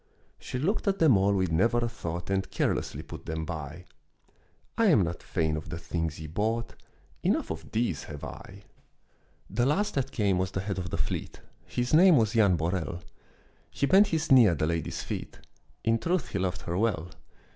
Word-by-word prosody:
She -, -, -5 dB
looked 185 Hz, -, -1 dB
at 195 Hz, 0 st, +2 dB
them 155 Hz, -, +5 dB
all 100 Hz, +1 st, +3 dB
with 95 Hz, -3 st, 0 dB
never 115 Hz, +9 st, +3 dB
a 120 Hz, 0 st, +1 dB
thought 85 Hz, -4 st, -5 dB
And 95 Hz, 0 st, 0 dB
careless -, -, -1 dB
put -, -, -9 dB
them 80 Hz, 0 st, -3 dB
by; 80 Hz, +1 st, -6 dB, 0.9 s
"I 230 Hz, -, +3 dB
am 150 Hz, -, +5 dB
not 85 Hz, 0 st, -4 dB
fain 80 Hz, -1 st, -1 dB
of 75 Hz, -, -6 dB
the 85 Hz, -, -4 dB
things 80 Hz, -1 st, -3 dB
ye 80 Hz, -, -7 dB
brought, 110 Hz, +9 st, -2 dB, 0.5 s
Enough -, -, 0 dB
of -, -, -7 dB
these 110 Hz, -, -1 dB
have 75 Hz, -2 st, -9 dB
I." -, -, -9 dB, 0.8 s
The 120 Hz, -, 0 dB
last 205 Hz, +8 st, +1 dB
that 135 Hz, -2 st, -1 dB
came 100 Hz, -4 st, +1 dB
was 95 Hz, 0 st, 0 dB
the 95 Hz, -, -3 dB
head 95 Hz, -1 st, -3 dB
of 90 Hz, 0 st, -4 dB
the -, -, -3 dB
fleet, -, -, -4 dB, 0.3 s
His 125 Hz, +2 st, -2 dB
name 175 Hz, 0 st, +7 dB
was 110 Hz, -3 st, +2 dB
Jan 100 Hz, -5 st, +4 dB
Borel; 85 Hz, +1 st, -2 dB, 0.7 s
He -, -, -1 dB
bent 195 Hz, +7 st, +6 dB
his 160 Hz, -7 st, -1 dB
knee 125 Hz, -4 st, +8 dB
at 85 Hz, -4 st, +1 dB
the 75 Hz, -, +1 dB
lady's 85 Hz, 0 st, -2 dB
feet, -, -, -6 dB, 0.5 s
In 115 Hz, 0 st, +2 dB
truth 175 Hz, +1 st, -1 dB
he 100 Hz, -, -2 dB
loved 90 Hz, -1 st, -2 dB
her 85 Hz, -, -3 dB
well. 95 Hz, -7 st, 0 dB
100 Hz, 195 wpm, -28 LUFS, 85-125 Hz, 0.9 s, knee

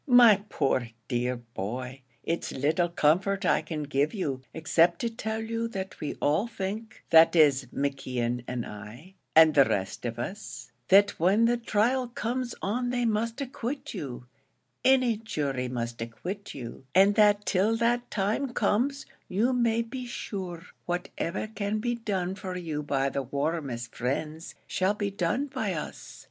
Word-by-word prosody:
"My 240 Hz, -6 st, +7 dB
poor, 130 Hz, -3 st, 0 dB, 0.2 s
dear 125 Hz, 0 st, 0 dB
boy, 120 Hz, +3 st, -6 dB, 0.2 s
it's 165 Hz, -, -2 dB
little 155 Hz, +6 st, +1 dB
comfort 180 Hz, +5 st, +2 dB
I -, -, +3 dB
can 155 Hz, -3 st, -4 dB
give 145 Hz, +4 st, 0 dB
you, 140 Hz, -10 st, -2 dB
except 165 Hz, +2 st, +3 dB
to 235 Hz, -, -1 dB
tell 220 Hz, -1 st, -3 dB
you 230 Hz, +1 st, -2 dB
that 190 Hz, -4 st, -6 dB
we 150 Hz, -, -3 dB
all 155 Hz, +10 st, +1 dB
think, 220 Hz, +2 st, -5 dB
that 165 Hz, +1 st, +7 dB
is 140 Hz, -5 st, +5 dB
McKeon 125 Hz, -3 st, -2 dB
and 125 Hz, -2 st, -3 dB
I, 110 Hz, -, -10 dB, 0.2 s
and 160 Hz, -1 st, +8 dB
the 140 Hz, -2 st, +6 dB
rest 95 Hz, -1 st, -2 dB
of 115 Hz, -1 st, -3 dB
us, 130 Hz, -, -6 dB, 0.2 s
that 200 Hz, +1 st, +6 dB
when 195 Hz, +7 st, +4 dB
the 240 Hz, +1 st, +3 dB
trial 240 Hz, +2 st, +1 dB
comes 240 Hz, +1 st, -3 dB
on 245 Hz, +5 st, 0 dB
they 245 Hz, -1 st, 0 dB
must 230 Hz, +3 st, 0 dB
acquit 270 Hz, +2 st, -4 dB
you 135 Hz, -, -6 dB, 0.6 s
any 255 Hz, -4 st, +4 dB
jury 140 Hz, -, -2 dB
must 120 Hz, -2 st, -4 dB
acquit 180 Hz, -, -6 dB
you; 120 Hz, -1 st, -8 dB
and 195 Hz, +2 st, +6 dB
that 205 Hz, -1 st, +4 dB
till 205 Hz, +4 st, +2 dB
that 240 Hz, +1 st, +1 dB
time 220 Hz, +6 st, -1 dB
comes, 275 Hz, +6 st, +1 dB, 0.2 s
you 220 Hz, +7 st, +1 dB
may 230 Hz, -2 st, +2 dB
be 250 Hz, +2 st, -6 dB
sure 185 Hz, -7 st, -5 dB, 0.2 s
whatever 175 Hz, +1 st, -2 dB
can 215 Hz, -1 st, -2 dB
be 240 Hz, +3 st, -1 dB
done 195 Hz, -6 st, -2 dB
for 190 Hz, -2 st, -5 dB
you 160 Hz, -4 st, -3 dB
by 140 Hz, -2 st, 0 dB
the 140 Hz, -, -2 dB
warmest 135 Hz, -3 st, -3 dB
friends, 150 Hz, +6 st, -3 dB
shall 190 Hz, +3 st, +1 dB
be 205 Hz, -1 st, -2 dB
done 195 Hz, +8 st, 0 dB
by 255 Hz, -9 st, -2 dB
us. 155 Hz, -, -7 dB
185 Hz, 155 wpm, -28 LUFS, 140-225 Hz, 0.6 s, and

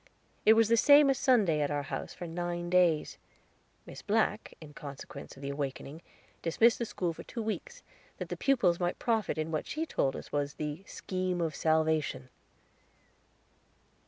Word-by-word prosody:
It 220 Hz, -, +10 dB
was 225 Hz, -1 st, +4 dB
the 230 Hz, +1 st, +3 dB
same 285 Hz, +3 st, +7 dB
as 265 Hz, -, -1 dB
Sunday 205 Hz, -, +3 dB
at 145 Hz, -, 0 dB
our 145 Hz, -1 st, -1 dB
house -, -, -5 dB
for 175 Hz, -, -8 dB
nine 175 Hz, +1 st, -4 dB
days. 175 Hz, -4 st, +2 dB, 0.7 s
Miss -, -, -10 dB
Black, 215 Hz, 0 st, 0 dB
in 150 Hz, -2 st, -12 dB
consequence 140 Hz, 0 st, -9 dB
of 135 Hz, -, -13 dB
the 140 Hz, -, -3 dB
awakening, 140 Hz, +2 st, -5 dB, 0.4 s
dismissed 225 Hz, +8 st, +3 dB
the 235 Hz, -, -1 dB
school 175 Hz, -5 st, -2 dB
for -, -, -10 dB
two 230 Hz, -, -6 dB
weeks, 350 Hz, -, -5 dB, 0.3 s
that -, -, -6 dB
the -, -, -3 dB
pupils 220 Hz, -11 st, +2 dB
might 175 Hz, -1 st, -1 dB
profit 225 Hz, -7 st, 0 dB
in 155 Hz, +1 st, -2 dB
what 155 Hz, -, -2 dB
she 315 Hz, +2 st, -2 dB
told 135 Hz, -, 0 dB
us -, -, -9 dB
was 145 Hz, 0 st, -2 dB
The 150 Hz, +4 st, -5 dB
Scheme 185 Hz, -1 st, -3 dB
of 165 Hz, -2 st, -1 dB
Salvation. 155 Hz, -5 st, 0 dB
175 Hz, 170 wpm, -30 LUFS, 150-220 Hz, 0.7 s, It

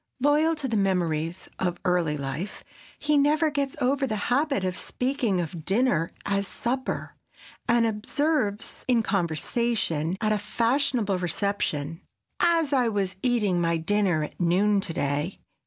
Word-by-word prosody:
Loyal 300 Hz, +4 st, +3 dB
to 295 Hz, -3 st, -2 dB
the 230 Hz, -, -1 dB
memories 175 Hz, -3 st, 0 dB
of 180 Hz, -2 st, -1 dB
early 175 Hz, -4 st, +1 dB
life, 140 Hz, +8 st, -5 dB, 0.3 s
he 295 Hz, 0 st, +2 dB
never 305 Hz, +2 st, +3 dB
gets 280 Hz, 0 st, -2 dB
over 270 Hz, +1 st, +1 dB
the 215 Hz, -, -1 dB, 0.2 s
habit 280 Hz, -6 st, +1 dB
of 185 Hz, -1 st, -1 dB
speaking 250 Hz, -7 st, -1 dB
of 170 Hz, -1 st, -4 dB
dinner 190 Hz, -4 st, +2 dB, 0.2 s
as 200 Hz, 0 st, 0 dB
"supper," 255 Hz, +5 st, -3 dB, 0.6 s
and 235 Hz, 0 st, +4 dB
observes 225 Hz, 0 st, -1 dB
in 240 Hz, -3 st, +3 dB
conversation 180 Hz, -2 st, 0 dB
at 215 Hz, -2 st, +1 dB
a 210 Hz, -, +2 dB
fashionable 230 Hz, -2 st, +1 dB
reception, 170 Hz, -3 st, -2 dB, 0.4 s
"As 330 Hz, -4 st, +3 dB
I 255 Hz, -3 st, +3 dB
was 200 Hz, -4 st, -1 dB
eating 210 Hz, -8 st, +2 dB
my 165 Hz, -1 st, +2 dB
dinner 175 Hz, -1 st, +1 dB
at 150 Hz, -, -8 dB
noon 195 Hz, +4 st, +3 dB
to 190 Hz, -, -3 dB
day." 145 Hz, +4 st, -1 dB
205 Hz, 140 wpm, -26 LUFS, 175-255 Hz, 0.6 s, and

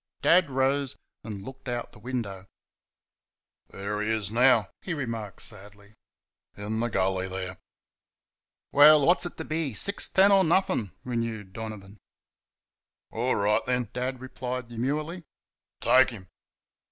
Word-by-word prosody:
Dad 175 Hz, -2 st, +5 dB
rose 135 Hz, +1 st, 0 dB, 0.3 s
and 105 Hz, -3 st, -7 dB
looked 130 Hz, +2 st, -9 dB
out 120 Hz, -1 st, -4 dB
the -, -, -15 dB
window. 105 Hz, -5 st, -5 dB, 1.2 s
"There 105 Hz, +2 st, -4 dB
he 105 Hz, -, -1 dB
is 110 Hz, -3 st, -1 dB
now," 120 Hz, -3 st, +4 dB
he 175 Hz, -, -4 dB
remarked 115 Hz, -, -5 dB
sadly, 105 Hz, 0 st, -14 dB, 0.6 s
"in 105 Hz, +2 st, -3 dB
the 120 Hz, +1 st, 0 dB
gully 95 Hz, -2 st, 0 dB
there." 95 Hz, 0 st, -6 dB, 1.1 s
"Well, 145 Hz, 0 st, +7 dB
what's 175 Hz, +2 st, +3 dB
it -, -, -12 dB
to 160 Hz, -, -4 dB
be 155 Hz, -6 st, -2 dB
six 200 Hz, -, +1 dB
ten 195 Hz, +1 st, +5 dB
or 195 Hz, -1 st, +6 dB
nothing?" 170 Hz, -, +1 dB
renewed 115 Hz, -5 st, -4 dB
Donovan. 105 Hz, -2 st, -8 dB, 1.1 s
"All 120 Hz, +3 st, 0 dB
right, 105 Hz, +1 st, +2 dB
then," 125 Hz, -3 st, -1 dB
Dad 125 Hz, +1 st, -3 dB
replied, 125 Hz, -1 st, -5 dB
demurely, 150 Hz, +9 st, -3 dB, 0.6 s
"take 130 Hz, +1 st, +5 dB
him!" 95 Hz, -7 st, -11 dB
120 Hz, 130 wpm, -27 LUFS, 105-135 Hz, 1.2 s, Well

